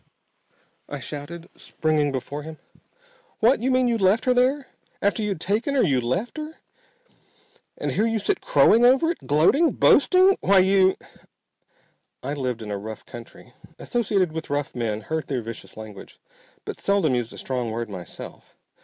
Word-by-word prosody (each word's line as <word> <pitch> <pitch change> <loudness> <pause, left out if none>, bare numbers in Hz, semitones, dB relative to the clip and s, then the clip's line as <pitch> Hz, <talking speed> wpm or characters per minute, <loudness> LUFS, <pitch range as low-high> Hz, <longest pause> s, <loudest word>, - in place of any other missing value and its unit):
I 145 - -5
shouted, 150 +6 -8
springing 155 -2 -1
before 135 +2 -5
him. 155 +1 -9 0.8
"What! 230 +1 +3
You 255 - 0
mean 255 -1 +3
you 235 -1 0
left 195 +3 +3
her 255 - +4
there! 260 +3 +1 0.3
After 200 +2 0
you'd 200 -5 -2
taken 215 - -1
her, 265 - +4
you 135 -8 +2
left 155 - -2
her! 310 +1 -7 1.2
And - - -2
here 215 +3 +1
you 225 0 0
sit 200 - -1
crowing 185 +11 +4
over 265 +7 +5
it! 345 - -9
Gloating! 175 - +4
Boasting! 370 +6 +5
Why 195 0 +4
you 190 0 +4 0.6
!" - - -43
I 140 +3 -3
lived 125 -5 -3
in 105 - -6
a 100 - -3
rough 110 +2 -8
country. 120 +1 -12 0.2
Associated 200 -7 0
with 160 0 -6
rough 145 0 -2
men, 110 -3 -2
heard 160 +7 -4
their 130 -4 -2
vicious 115 -1 -9
language, 110 -2 -11 0.5
but - - -6
seldom 200 -8 +1
used 120 -2 -1
a - - -11
strong 125 -3 -3
word 115 +1 -4
myself. 90 -4 -10
160 Hz, 165 wpm, -24 LUFS, -, 1.2 s, over